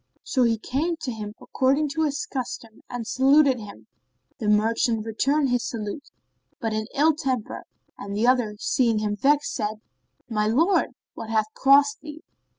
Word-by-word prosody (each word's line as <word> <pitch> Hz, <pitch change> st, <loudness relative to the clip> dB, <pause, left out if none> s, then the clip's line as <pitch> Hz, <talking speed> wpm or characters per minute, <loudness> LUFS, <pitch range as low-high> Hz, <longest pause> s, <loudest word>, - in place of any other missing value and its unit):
So 260 Hz, -, 0 dB
he 230 Hz, -2 st, +3 dB
came 295 Hz, +10 st, -2 dB
to 255 Hz, -, -3 dB
him 210 Hz, -2 st, -7 dB
according 275 Hz, +3 st, +1 dB
to 315 Hz, +3 st, 0 dB
his 290 Hz, -1 st, -2 dB
custom 240 Hz, -4 st, -6 dB
and 245 Hz, -2 st, -5 dB
saluted 270 Hz, +1 st, +4 dB
him. 200 Hz, -, -11 dB, 0.5 s
The 215 Hz, -, -3 dB
merchant 220 Hz, +1 st, +2 dB
returned 275 Hz, +6 st, +1 dB
his 245 Hz, -1 st, +1 dB
salute, 225 Hz, +5 st, -5 dB, 0.5 s
but 225 Hz, -1 st, -2 dB
in 215 Hz, 0 st, -2 dB
ill 310 Hz, +3 st, +4 dB
temper, 260 Hz, -6 st, -3 dB, 0.3 s
and 200 Hz, 0 st, -6 dB
the 215 Hz, +3 st, +1 dB
other, 245 Hz, -4 st, +2 dB
seeing 230 Hz, +1 st, +1 dB
him 210 Hz, -1 st, -1 dB
vexed, 285 Hz, +7 st, +2 dB
said, 215 Hz, -2 st, -2 dB
"O -, -, -25 dB, 0.5 s
my 210 Hz, -1 st, +1 dB
lord, 325 Hz, -, +2 dB, 0.2 s
what 225 Hz, -, -8 dB
hath 215 Hz, -1 st, 0 dB
crossed 280 Hz, +1 st, +4 dB
thee?" 305 Hz, +1 st, -10 dB
245 Hz, 165 wpm, -24 LUFS, 215-280 Hz, 0.5 s, saluted